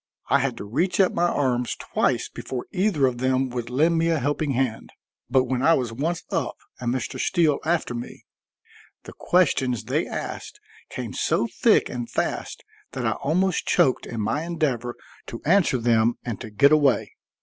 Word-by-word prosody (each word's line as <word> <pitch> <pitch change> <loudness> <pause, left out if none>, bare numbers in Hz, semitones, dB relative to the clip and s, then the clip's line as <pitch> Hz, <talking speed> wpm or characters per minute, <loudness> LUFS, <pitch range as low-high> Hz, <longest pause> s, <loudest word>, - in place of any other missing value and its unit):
I 140 - +5
had 135 -3 -1
to - - -6
reach 170 - -1
up 190 - +4
my 175 +1 +2
arms 125 -6 0
twice - - 0
before 125 -2 -6
either 185 -7 +2
of 125 -2 -1
them 130 +1 +1
would 120 -1 -4
lend 160 +6 +2
me 165 +1 +2
a 165 - +2
helping 145 +1 -1
hand. 125 -3 -1 0.4
But 130 0 +4
when 130 0 -2
I 165 +4 +5
was 120 -3 -2
once 160 +8 -2
up - - -1 0.2
and 120 -1 -1
Mr. 130 -2 -3
Steele 160 -6 +2
after 165 -6 0
me, 120 0 -8 0.8
the - - -11
questions 135 - +1
they 135 +9 -1
asked 420 - -6 0.3
came - - -6
so - - +1
thick 230 0 +3
and 120 -1 -5
fast - - -3 0.3
that - - -3
I - - +2
almost 180 +5 0
choked 130 - +2
in 115 -2 -4
my 110 +8 -1
endeavor 145 -8 -2 0.3
to 115 - -6
answer 170 -4 +3
them 115 -1 +2
and 120 -4 -4
to 110 - -7
get 140 +7 +4
away. 135 -9 +3
135 Hz, 180 wpm, -24 LUFS, 120-165 Hz, 0.8 s, I